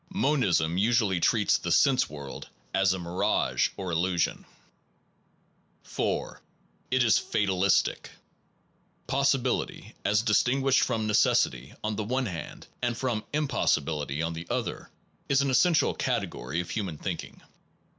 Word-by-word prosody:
Monism 95 - +2
usually 105 -4 +2
treats 105 +3 +2
the 85 - -3
sense 130 - +3
world 70 -2 -8 0.2
as 95 0 +3
a 95 - -1
mirage 85 0 0
or 95 -2 -4
illusion. 85 +1 0 1.4
4. - - -3 0.5
It 130 0 +3
is 115 - +4
fatalistic. 95 -2 +1 1.0
Possibility, 135 -1 0
as 105 +1 +2
distin 125 +4 +2
guished 135 -1 +4
from 110 -1 0
necessity 65 - +1
on 110 -1 -2
the 110 - -1
one 130 +5 -1
hand 85 - -7 0.2
and 120 -1 -1
from 120 -5 -2
impossibility 80 - 0
on 85 0 -2
the 85 +1 -7
other, - - -3 0.4
is 140 0 +3
an 140 - 0
essential 160 +5 +3
category 75 +8 -2
of 85 - -8
human 95 -8 -3
thinking. - - -6
105 Hz, 125 wpm, -27 LUFS, 85-130 Hz, 1.4 s, is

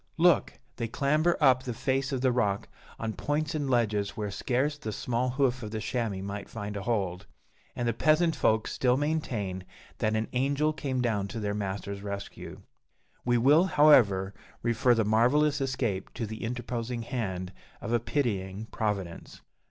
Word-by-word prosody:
Look! 170 0 +4 0.2
They 115 - -2
clamber 150 +8 +2
up 130 -4 +5
the 125 -2 -5
face 135 +2 0
of 130 -2 -1
the 130 -1 +3
rock, 105 -5 0 0.3
on 110 -1 -3
points 150 +5 -1
and 145 -3 -2
ledges 110 -4 +1
where 105 -2 -2
scarce 130 +7 0
the 110 -7 -5
small 125 +4 -1
hoof 130 -1 +1
of 110 - -5
the 110 0 -4
chamois 110 -5 -2
might 100 0 -5
find 105 -2 -5
a 100 - -3
hold; 95 -5 -2 0.5
and 120 - -1
the 115 - +2
peasant 160 +6 +3
folk 110 0 +2
still 125 -1 +2
maintain 120 -11 -2 0.4
that 110 0 +1
an 110 0 0
angel 140 +4 +1
came 135 -5 -2
down 105 -5 0
to 105 +3 -5
their 105 -1 -1
master's 100 0 -4
rescue. 100 -1 -7 0.6
We 120 0 +3
will, 145 +9 +5
however, 115 - +5 0.3
refer 120 +1 +3
the 110 -2 +1
marvellous 140 +7 +3
escape 120 -8 -2
to 115 - -2
the 110 +2 -7
interposing 120 0 -3
hand 95 -7 -3 0.3
of 115 - -4
a 120 - +4
pitying 110 -5 -2
Providence. 100 -6 -3
120 Hz, 165 wpm, -29 LUFS, 105-135 Hz, 0.6 s, up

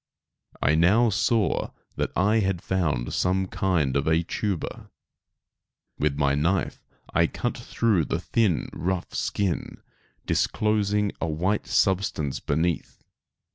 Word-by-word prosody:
I 70 - +4
now 100 +9 +4
saw 110 +1 +1 0.3
that - - -1
I 105 +4 +3
had 95 -4 0
found 80 -11 -1
some 95 +1 +1
kind 85 -8 0
of 70 +2 0
a 80 +1 +3
tuber. 95 0 -3 1.1
With 70 -1 0
my 70 -2 +2
knife 85 +5 -1 0.3
I 85 +1 +4
cut 120 - -3
through 115 -7 +1
the - - -2
thin 105 -8 +1
rough 90 0 -3
skin, 100 -4 -2 0.5
disclosing 105 -1 +1
a - - 0
white 90 +7 -1
substance 95 -9 +1
beneath. 80 +3 -2
90 Hz, 120 wpm, -25 LUFS, 80-105 Hz, 1.1 s, I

